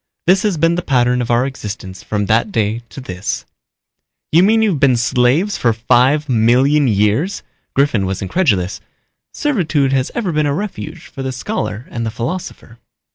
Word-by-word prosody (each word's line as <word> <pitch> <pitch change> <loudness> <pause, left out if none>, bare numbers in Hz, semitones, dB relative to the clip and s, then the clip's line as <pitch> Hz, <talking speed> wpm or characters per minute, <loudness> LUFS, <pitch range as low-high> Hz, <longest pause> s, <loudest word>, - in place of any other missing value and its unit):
This 185 +2 +4
has 205 -6 0
been 165 +2 +3
the 175 - -1
pattern 125 -4 +1
of 120 - -4
our 120 +2 +3
existence 105 -7 -7
from 105 -1 -2
that 115 - +1
day 110 - 0
to - - -9
this." 95 -6 -4 0.9
"You 165 - +5
mean 220 +4 +4
you've 195 -9 +1
been 130 -3 +4
slaves 125 - +1
for 115 -2 +2
five 125 +6 +2
million 130 +5 +3
years?" 110 - +1 0.3
Griffin 125 -9 +2
was 95 0 -3
incredulous. 100 - 0 0.5
"Servitude 160 - 0
has 130 -1 +1
ever 215 -7 -1
been 150 -1 +1
a 140 - 0
refuge 175 -4 -6
for 135 - -9
the 130 0 -3
scholar 125 - -4
and 115 - -3
the 115 - -1
philosopher." 120 -1 -6
130 Hz, 170 wpm, -17 LUFS, 115-165 Hz, 0.9 s, You